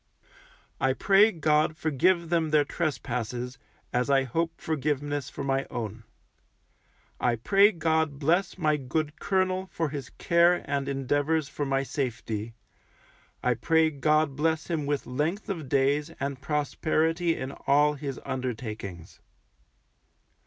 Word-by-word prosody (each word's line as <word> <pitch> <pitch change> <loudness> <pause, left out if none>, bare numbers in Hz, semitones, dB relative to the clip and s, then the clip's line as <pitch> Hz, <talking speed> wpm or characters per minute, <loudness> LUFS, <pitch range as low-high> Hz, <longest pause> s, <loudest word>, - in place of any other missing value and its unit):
I 130 0 +2
pray 200 +8 +5
God 155 -2 +1
forgive 170 +3 +1
them 165 -2 +1
their 150 -1 +4
trespasses, 125 -5 -3 0.3
as 125 +2 +1
I 135 -1 +4
hope 165 +6 -2
forgiveness 145 -2 -2
for - - -6
my 135 0 0
own. 115 -3 -5 1.1
I 120 -1 +2
pray 195 - +4
God 160 -4 0
bless 170 +7 +1
my 155 -4 +2
good 150 +3 -3
colonel 185 -1 0
for 165 -2 -1
his 140 -3 -6
care 170 +1 +3
and 140 -1 -2
endeavours 145 +3 0
for 145 - -3
my 135 0 +1
safety; 115 -5 -4 0.9
I 125 - +3
pray 160 +7 +2
God 150 0 +2
bless 160 +3 0
him 155 -4 -1
with 145 -1 -1
length 150 - -2
of 160 -9 -4
days 140 +3 +2
and 140 -1 -3
prosperity 160 +3 0
in 130 +1 -5 0.2
all 145 +2 +4
his 140 -2 -5
undertakings. 110 -9 -5
145 Hz, 130 wpm, -27 LUFS, 135-160 Hz, 1.1 s, pray